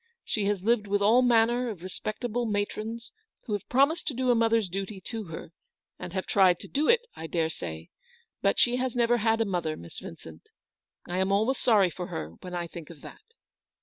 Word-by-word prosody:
She 210 -3 -1
has 200 -2 0
lived 220 -1 +2
with 200 0 +1
all 230 +5 +6
manner 240 0 +3
of 190 -6 -7
respectable 225 +5 -3
matrons, 215 +2 -3 0.3
who 215 - -4
have 205 - -4
promised 280 +7 +3
to 285 - -1
do 255 0 +2
a - - +6
mother's 225 -2 +3
duty 195 +2 -5
to 225 +1 -5
her, 165 -1 -8 0.5
and 180 - -6
have 190 -1 -2
tried 185 -3 +4
to - - -8
do 295 +2 0
it, 470 0 +6
I 160 - -6
daresay; 150 - -3 0.5
but - - +2
she 245 0 +3
has 255 -1 -1
never 240 0 +3
had 225 0 +2
a - - +3
mother, 175 -5 -2
Miss 85 0 -9
Vincent. 80 0 -11 0.6
I 180 +1 -2
am 190 +1 +1
always 220 +7 +2
sorry 205 -7 +4
for 180 +1 -6
her 80 0 -5
when 180 -1 -6
I 175 -1 -2
think 170 -2 -10
of 160 -4 -12
that." - - -11
210 Hz, 205 wpm, -28 LUFS, 180-235 Hz, 0.6 s, all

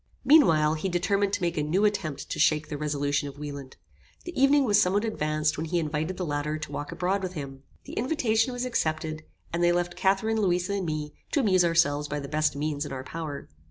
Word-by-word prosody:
Meanwhile 165 - +5
he 190 - -1
determined 195 +3 +1
to 195 - -1
make 170 -1 -1
a - - +2
new 175 +8 +1
attempt 180 -9 -1
to - - -3
shake 155 0 +2
the 150 - -4
resolution 145 -1 -1
of 140 - -12
Wieland. 140 -2 -7 0.5
The 350 - -6
evening 275 +2 +4
was 210 -2 +4
somewhat 205 +3 +2
advanced 155 -7 0
when 160 - -3
he 175 +2 0
invited 160 +2 -2
the 180 - -2
latter 150 0 -2
to 155 - -7
walk 145 0 -5
abroad 190 +2 -1
with 185 -1 -4
him. 135 -4 -7 0.2
The - - -10
invitation 235 -3 +1
was 245 0 -3
accepted, 155 -8 -1 0.3
and 170 +1 0
they 175 - +5
left 175 0 -1
Catharine, 215 +3 +1
Louisa 180 0 +1
and 195 -3 -2
me, 150 -1 -3 0.2
to 290 - +3
amuse 185 -6 +4
ourselves 150 -4 +2
by 145 0 -3
the 140 - -6
best 155 -1 0
means 145 0 -2
in 145 - -7
our 130 -1 -5
power. 155 0 -6
165 Hz, 220 wpm, -27 LUFS, 150-195 Hz, 0.5 s, Meanwhile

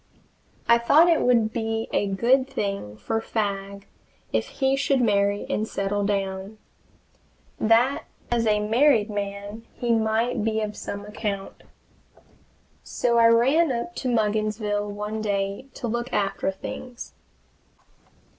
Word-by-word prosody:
I 235 0 +6
thought 295 +8 +5
it 330 - +3
would 230 -3 +3
be 225 -1 -2
a 205 - +1
good 245 +7 +2
thing 195 - -3
for 225 - -2
Fagg 200 -2 -3 0.5
if - - 0
he 270 0 0
should 275 -1 +1
marry 205 -3 +2
and 215 - -1
settle 200 0 -1
down; 195 0 -2 1.0
that 235 +5 +3 0.3
as 235 -1 +1
a 210 -1 +3
married 230 -2 +3
man 205 +2 -5
he 240 -1 -1
might 225 +1 +1
be 220 0 0
of 210 -1 -3
some 200 0 -6
account. 205 -2 -5 1.2
So 235 -1 0
I 230 - +7
ran 265 +8 +4
up 245 +9 -3
to 260 - -3
Mugginsville 215 -2 0
one 210 +1 -4
day 200 +3 -2
to 245 - -4
look 240 +2 -3
after 195 -1 0
things. 240 +5 -8
220 Hz, 130 wpm, -25 LUFS, 205-235 Hz, 1.2 s, I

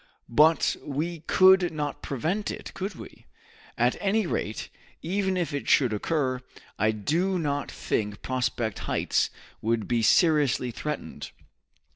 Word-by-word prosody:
But 155 +5 +4
we 160 +4 -3
could 190 -1 +6
not 150 -2 -4
prevent 170 - -2
it, - - -7
could 195 0 -4
we? - - -12 0.5
At 120 +2 +2
any 205 +1 +1
rate, 110 -9 -3 0.3
even 190 +2 0
if 170 -4 -1
it 140 - -3
should 125 -6 +4
occur, 130 +2 -1 0.4
I 110 +1 +3
do 165 - 0
not 145 -4 -2
think 105 -1 -3
Prospect 120 -4 -1
Heights - - +1 0.3
would 115 0 0
be 120 -1 +1
seriously 145 - +3
threatened. 150 +6 -5
150 Hz, 130 wpm, -27 LUFS, 120-175 Hz, 0.5 s, could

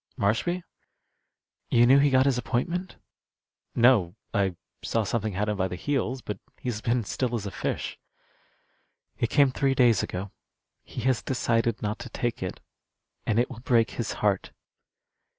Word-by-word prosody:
"Marshby?" 170 - 0 1.1
"You 120 0 +5
knew 135 +3 +7
he 145 +1 +5
got 130 0 +4
his 135 -3 +2
appointment?" 170 +10 -2 0.8
"No; 115 -8 +4 0.2
I 95 -4 +1 0.3
saw 115 - +1
something 110 0 -1
had 105 +3 -1
him 105 -1 -1
by 95 -1 +1
the 90 - -5
heels, 130 +3 -1
but 105 -2 -5 0.2
he's 120 -4 -3
been 120 +1 +1
still 120 +3 -1
as 105 -3 -3
a 100 - -4
fish." 90 - -3 1.2
"It 115 - +1
came 140 -2 +4
three 135 0 +1
days 120 -5 +5
ago. 95 +2 -4 0.5
He - - -7
has 130 -2 +2
decided 115 -3 0
not 105 +1 -2
to - - -7
take 120 -3 -2
it. 90 -1 -4 0.7
And 110 - +2
it 120 - +3
will 120 - -8
break 115 -2 +2
his 115 - -3
heart." 100 -2 +1
115 Hz, 160 wpm, -27 LUFS, 105-130 Hz, 1.2 s, knew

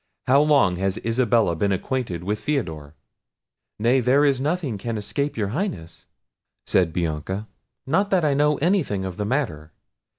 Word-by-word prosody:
How 135 +3 +5
long 140 -12 +3
has 95 +2 -1
Isabella 115 -6 +2
been 100 +4 0
acquainted 95 -3 -2
with 105 +3 -2
Theodore?" 80 - -3 0.8
"Nay, 120 +5 +3
there 130 +4 +3
is 135 -2 +2
nothing 145 - -1
can 115 +2 -3
escape 140 +8 -3
your 105 -3 -1
Highness!" 125 - -5 0.6
said 90 -3 +2
Bianca; 85 +5 -3 0.4
"not 190 +9 +1
that 185 -5 +2
I 145 - +3
know 150 +1 +2
any 185 +6 +2
thing 100 - -3
of 95 -2 -6
the 105 - -2
matter. 100 - -2
115 Hz, 160 wpm, -23 LUFS, 95-145 Hz, 0.8 s, How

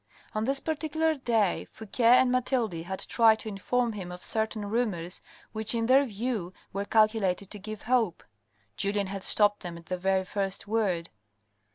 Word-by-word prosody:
On 215 +1 -1
this 275 +2 +1
particular 315 +1 0
day, 230 - +1
Fouque 220 +2 -11
and 250 +2 +6
Mathilde 255 -4 +1
had 175 +3 -5
tried 225 -3 +4
to 220 - -5
inform 230 +4 -1
him 185 -4 -6
of 180 0 -9
certain 220 -1 -1
rumours 200 -6 -2 0.3
which 220 +1 +1
in 230 0 0
their 265 +4 +5
view 215 -5 -3 0.2
were 200 +1 -2
calculated 215 -4 +2
to 210 - -4
give 215 +1 -7
hope. 230 -7 +1 0.5
Julien 200 - 0
had 195 0 -6
stopped 205 -1 +4
them 175 -2 -7
at 170 - -13
the 185 +2 -3
very 190 +1 +1
first 195 0 -2
word. 200 -6 0
215 Hz, 170 wpm, -28 LUFS, 190-240 Hz, 0.5 s, and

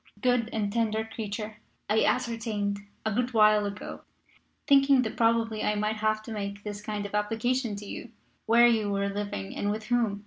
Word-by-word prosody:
"Good 245 -3 +2
and 205 -2 -1
Tender 220 -1 0
Creature, 215 -1 -5 0.3
I 215 +2 +3
ascertained, 225 -5 0 0.3
a 220 - +1
good 245 +2 -1
while 215 -1 +5
ago, 200 +1 -7 0.6
thinking 275 -2 +5
that 220 - -4
probably 225 -1 +2
I 210 - +1
might 210 +1 -1
have 215 0 0
to 225 - -8
make 200 -1 -5
this 205 -1 -5
kind 210 -1 -4
of 205 - -7
application 225 +2 0
to 205 +1 -8
you, - - -7 0.4
where 235 +2 +6
you 220 -3 +3
were 200 0 0
living 200 - -4
and 205 - -1
with 215 +1 -2
whom. 230 -5 +1
215 Hz, 180 wpm, -28 LUFS, 205-230 Hz, 0.6 s, where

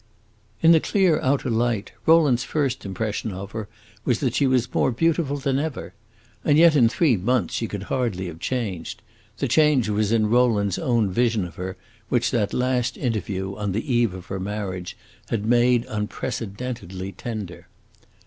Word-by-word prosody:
In 165 - +7
the 165 - +7
clear 185 -2 +2
outer 130 -1 +1
light, 115 -2 0 0.2
Rowland's 150 -7 +5
first 135 -7 -1
impression 105 +2 -3
of 100 +1 -7
her 110 -1 -6 0.3
was 120 -3 +1
that 130 -5 0
she 140 +1 +2
was 125 -1 +1
more - - +2
beautiful 150 +2 +1
than 135 -1 0
ever. 150 -3 -4 0.5
And 145 -1 +3
yet 165 -1 +6
in 120 -5 +5
three 135 -2 +2
months 120 +7 0
she 115 - -1
could 100 -2 -5
hardly 105 -6 -2
have 85 -2 -7
changed; 105 -4 -4 0.3
the 140 - -1
change 140 -3 +3
was 105 0 +1
in 110 -2 +3
Rowland's 110 -5 +2
own 115 -6 +1
vision 115 -1 +1
of 85 - -9
her, 95 +1 -6 0.3
which 120 0 +1
that 105 -5 0
last 125 -1 0
interview, 100 -6 -2
on 105 -2 -3
the 115 +6 -2
eve 120 -5 +2
of 90 -1 -9
her 95 +1 -5
marriage, 95 -2 -4 0.3
had 110 -2 -1
made 120 +1 +3
unprecedentedly 105 -3 -4
tender. 100 -2 -7
115 Hz, 170 wpm, -23 LUFS, 100-130 Hz, 0.5 s, In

